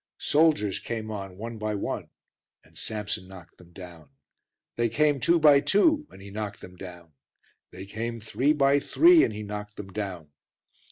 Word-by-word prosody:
Soldiers 150 - +2
came 110 -2 -5
on 95 -3 -7
one 115 +2 -7
by 105 0 -2
one 100 - -4 0.5
and - - -24
Samson 105 -3 -4
knocked 90 -3 -14
them 90 -1 -17
down; 85 -5 -12 0.7
they 120 0 +1
came 145 +5 +2
two 170 +6 +3
by 150 -2 +7
two 295 - +2
and - - -15
he 100 - -10
knocked 105 -1 -5
them 90 - -12
down; 90 -3 -11 0.6
they 95 +1 -10
came 115 +3 -5
three 125 +6 0
by 140 -1 +3
three 335 - +5
and - - +1
he 105 0 -6
knocked 105 0 -7
them 95 -2 -9
down. 95 -8 -5
105 Hz, 170 wpm, -26 LUFS, 95-140 Hz, 0.7 s, by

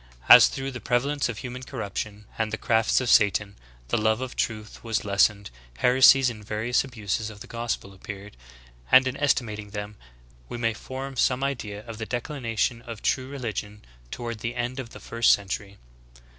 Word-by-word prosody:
As, - - +10
through 135 0 -4
the 125 - -7
prevalence 135 +3 0
of 115 - -4
human 125 +1 -6
corruption 105 -4 -5
and 110 -1 0
the 110 - -2
crafts 110 0 +2
of 130 - -3
Satan, 105 -2 +3 0.3
the - - +1
love 110 +1 +2
of 130 0 -5
truth 110 -1 -3
was 115 -2 -1
lessened, 100 - +2 0.3
heresies 130 - +6
and 110 -4 -4
various 110 +4 0
abuses 110 -4 -3
of 105 -2 -12
the - - -7
gospel 115 -4 -4
appeared; 100 +1 -9 0.6
and 130 +1 +7
in 130 - -2
estimat 125 -7 0
ing 105 -1 -8
them 105 0 -6 0.5
we - - -5
may 115 -1 0
form 130 +4 -7
some 125 +1 +2
idea 110 -7 -4
of 115 -2 -8
the 110 - -4
declension 120 -3 -2
of 115 -2 -9
true 130 -1 0
religion 105 -6 -5 0.2
toward 115 - -5
the 120 +2 -4
end 125 +2 -3
of 125 -3 -6
the - - -11
[first] 115 0 +2
century." 100 0 -4
115 Hz, 180 wpm, -26 LUFS, 105-125 Hz, 0.6 s, As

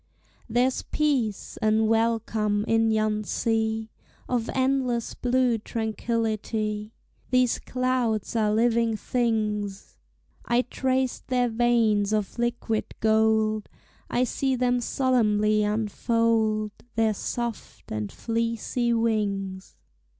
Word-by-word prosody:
There's 245 +3 +2
peace 265 -9 -1
and 220 0 +2
welcome 225 -2 +1
in 225 0 +3
yon 215 -1 +1
sea 220 0 -1 0.4
Of 240 -2 -1
endless 260 -3 0
blue 250 -2 +1
tranquillity: 220 -1 -2 0.4
These 255 -2 +2
clouds 250 -4 -1
are 215 -2 +2
living 230 0 +2
things; 210 -5 -2 0.4
I 240 +1 +2
trace 260 0 -1
their 250 -1 +1
veins 225 -3 +2
of 210 +1 -2
liquid 235 -2 -1
gold, 220 -1 +2 0.4
I 245 - +1
see 265 +1 0
them 245 0 +1
solemnly 215 -5 +2
unfold 215 0 +1 0.2
Their 225 -1 +2
soft 235 +2 -5
and 105 -1 -3
fleecy 230 +1 -1
wings. 200 -4 -1
225 Hz, 100 wpm, -26 LUFS, 215-240 Hz, 0.4 s, in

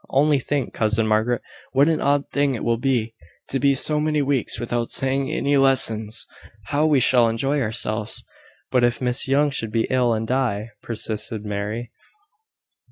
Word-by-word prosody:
Only 145 +1 +2
think, 140 0 -3
cousin 110 0 +1
Margaret! 110 +3 0 0.3
what 140 +2 +4
an 165 -1 0
odd 140 0 +1
thing 140 -2 +1
it - - -6
will 115 -1 0
be, 120 -4 -1 0.4
to 135 - -1
be 140 +1 +3
so 150 +3 +2
many 150 -1 0
weeks 135 -5 0
without 120 0 -2
saying 135 0 +1
any 145 -2 +1
lessons! 115 -5 +3 0.4
How 150 +2 +1
we 150 -3 +3
shall 120 -2 +4
enjoy 135 +6 -1
ourselves!" 110 -1 0 0.5
"But 125 -1 +2
if 120 -1 +1
Miss 125 +1 +2
Young 145 +2 +2
should 115 -5 -3
be 115 +1 0
ill, 125 -3 +2
and 110 +1 -3
die!" 115 -4 -1
persisted 110 -1 -3
Mary. 105 +3 -4
125 Hz, 165 wpm, -22 LUFS, 115-140 Hz, 0.5 s, what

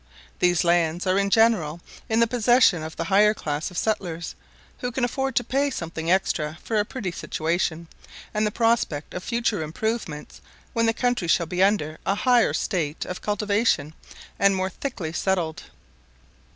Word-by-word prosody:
These 180 0 +3
lands 170 0 +2
are 185 +1 +2
in 200 0 +1
general 200 -8 +3 0.3
in 225 +1 +2
the - - +6
possession 235 -6 +4
of 160 0 -7
the - - -2
higher 210 +2 +4
class 150 -4 -3
of 180 - -10
settlers, 175 -6 -2 0.5
who 245 - -3
can 245 +1 0
afford 270 +2 -2
to 245 - +3
pay 275 +4 0
something 165 -7 -4
extra 160 -4 +1
for 225 - -1
a 205 - +1
pretty 210 -6 -4
situation, 165 0 -2 0.5
and 210 0 +1
the - - +1
prospect 220 -10 0
of 180 - -5
future 230 -5 0
improvements 160 -1 -4 0.3
when 230 -1 +2
the - - +4
country 245 -8 0
shall 170 +1 +3
be 180 +3 -2
under 175 -6 +2
a 195 - +1
higher 245 +1 +3
state 165 -7 -2
of 180 - -6
cultivation 205 -6 0 0.5
and 200 0 +4
more 190 0 -1
thickly 185 - -5
settled. 170 -3 -1
190 Hz, 165 wpm, -24 LUFS, 165-225 Hz, 0.5 s, the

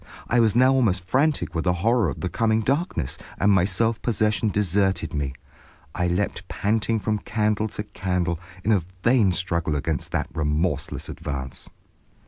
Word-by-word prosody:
I 120 - +3
was 110 -3 +4
now 130 +2 +5
almost 105 -9 +2
frantic 130 - +1
with 80 -1 -2
the 90 - +3
horror 115 -5 +3
of 65 - -6
the - - -1
coming 110 +4 +1
darkness, 135 - -1 0.2
and 100 - +3
my 95 -2 +4
self 110 +4 0
possession 110 -1 +1
deserted 95 -3 +1
me. 70 -3 -1 0.6
I 90 - 0
leaped 90 0 -1
panting 110 +3 0
from 105 0 -1
candle 105 -1 0
to 105 0 -5
candle 90 -4 -2 0.2
in 110 - +2
a 100 -4 +4 0.2
vain 115 -5 +4
struggle 85 -4 -1
against 75 +2 -2
that - - -1
remorseless 75 -1 -1
advance. 65 -1 -5
100 Hz, 160 wpm, -24 LUFS, 85-110 Hz, 0.6 s, now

